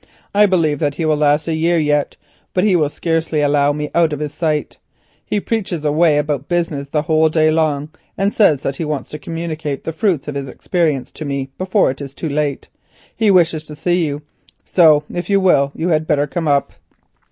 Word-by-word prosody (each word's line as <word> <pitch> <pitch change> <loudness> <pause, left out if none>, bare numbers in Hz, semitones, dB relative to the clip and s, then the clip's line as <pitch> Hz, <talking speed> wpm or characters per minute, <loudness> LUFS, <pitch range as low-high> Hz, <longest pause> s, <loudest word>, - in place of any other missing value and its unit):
I 205 +1 +5
believe 160 -6 +1
that 145 -2 -1
he 160 - -2
will 155 -1 +2
last 150 +1 +2
a 165 - 0
year 165 +2 +1
yet, 150 -2 0 0.4
but 180 - +2
he 205 -3 +3
will 155 -4 +2
scarcely 165 -1 -1
allow 145 0 +3
me 150 0 -4
out 165 -2 +2
of 145 - -4
his 150 -1 -4
sight. 155 -3 -2 0.4
He 210 - -1
preaches 190 -8 -3
away 150 +1 +3
about 145 -2 -1
business 165 -5 -1
the 150 +1 -1
whole 160 0 +3
day 155 0 +3
long 155 -2 0 0.3
and 195 +2 0
says 155 -10 +3
that 135 - -2
he - - -3
wants 150 -3 -4
to 150 - -6
communicate 160 -3 -5
the 160 - -4
fruits 165 -4 0
of 145 - -4
his 140 -1 -4
experience 155 -4 -1
to - - -8
me 140 -2 -4
before 185 -3 +2
it 135 - -9
is 140 -1 -8
too 160 - -4
late. 145 -1 -2 0.5
He 220 -2 +2
wishes 170 -4 +3
to 150 - -9
see 175 +3 0
you, 145 +1 -5 0.4
so 155 -4 +5
if 175 +2 -5
you 200 -1 +4
will 140 -7 +3
you 170 +3 -2
had 155 -1 +1
better 145 -2 +2
come 165 +2 -3
up." 140 -1 +1
155 Hz, 210 wpm, -18 LUFS, 145-170 Hz, 0.5 s, I